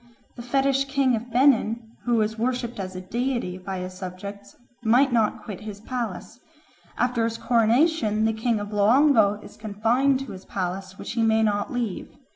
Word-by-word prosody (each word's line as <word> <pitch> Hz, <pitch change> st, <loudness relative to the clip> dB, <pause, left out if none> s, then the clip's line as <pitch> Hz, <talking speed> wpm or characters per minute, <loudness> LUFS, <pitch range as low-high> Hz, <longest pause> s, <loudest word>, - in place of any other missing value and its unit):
The 240 Hz, -, -8 dB
fetish 270 Hz, +2 st, +1 dB
king 270 Hz, -2 st, +2 dB
of 235 Hz, +2 st, -6 dB
Benin, 235 Hz, -3 st, +2 dB
who 240 Hz, -1 st, +2 dB
was 220 Hz, -1 st, +1 dB
worshipped 240 Hz, 0 st, -2 dB
as 185 Hz, -1 st, -5 dB
a 185 Hz, -, -5 dB
deity 235 Hz, -2 st, -2 dB
by 190 Hz, +1 st, -5 dB
his 185 Hz, 0 st, -5 dB
subjects, 190 Hz, +2 st, -8 dB, 0.3 s
might 245 Hz, +4 st, +3 dB
not 225 Hz, -3 st, +1 dB
quit 200 Hz, -2 st, -7 dB
his 210 Hz, -2 st, -7 dB
palace. 230 Hz, -2 st, -5 dB, 0.6 s
After 245 Hz, -1 st, +1 dB
his 230 Hz, 0 st, -1 dB
coronation 230 Hz, -1 st, +2 dB
the 225 Hz, -, +2 dB
king 225 Hz, 0 st, 0 dB
of 205 Hz, 0 st, -6 dB
Loango 220 Hz, 0 st, +4 dB
is -, -, -13 dB
confined 230 Hz, +6 st, +1 dB
to 270 Hz, -, -7 dB
his 190 Hz, 0 st, -10 dB
palace, 190 Hz, 0 st, -4 dB
which -, -, -6 dB
he 230 Hz, -, -1 dB
may 220 Hz, 0 st, +3 dB
not 205 Hz, -1 st, 0 dB
leave. 240 Hz, -6 st, -3 dB
225 Hz, 175 wpm, -25 LUFS, 205-245 Hz, 0.6 s, Loango